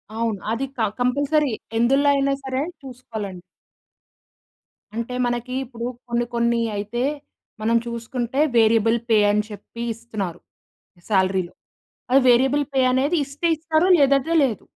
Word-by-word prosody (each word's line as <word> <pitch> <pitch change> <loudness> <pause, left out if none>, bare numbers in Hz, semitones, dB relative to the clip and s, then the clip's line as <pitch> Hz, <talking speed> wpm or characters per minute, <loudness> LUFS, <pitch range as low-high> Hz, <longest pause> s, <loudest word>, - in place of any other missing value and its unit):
అవును. 225 -3 -1
అది 235 +4 -1
క - - -9 0.2
కంపల్సరీ 285 +3 +1 0.3
ఎందులో 275 +5 +3
అయినా 275 0 +1
సరే 265 0 -2 0.2
చూసుకోవాలండి. 225 -8 -7 1.5
అంటే 235 +2 -3
మనకి 240 +1 -2
ఇప్పుడు 235 -1 -7 0.2
కొన్ని 240 0 0
కొన్ని 235 0 +2
అయితే 210 +5 -3 0.6
మనం 230 +2 +3
చూసుకుంటే 235 +2 -3 0.2
వేరియబుల్ 225 0 +4
పే 220 - +5
అని 210 0 +1
చెప్పి 210 +3 -10
ఇస్తున్నారు 215 -6 -5 0.7
సాలరీ‌లో. 190 -3 +1 0.6
ఆ - - +5
వేరియబుల్ 270 +4 +3
పే 265 - +3
అనేది 280 +7 +1
ఇస్తే 280 +5 -2
ఇస్తారు 320 +2 +1
లేదంటే 275 +3 +3
లేదు. 240 -7 -1
240 Hz, 120 wpm, -22 LUFS, 225-270 Hz, 1.5 s, పే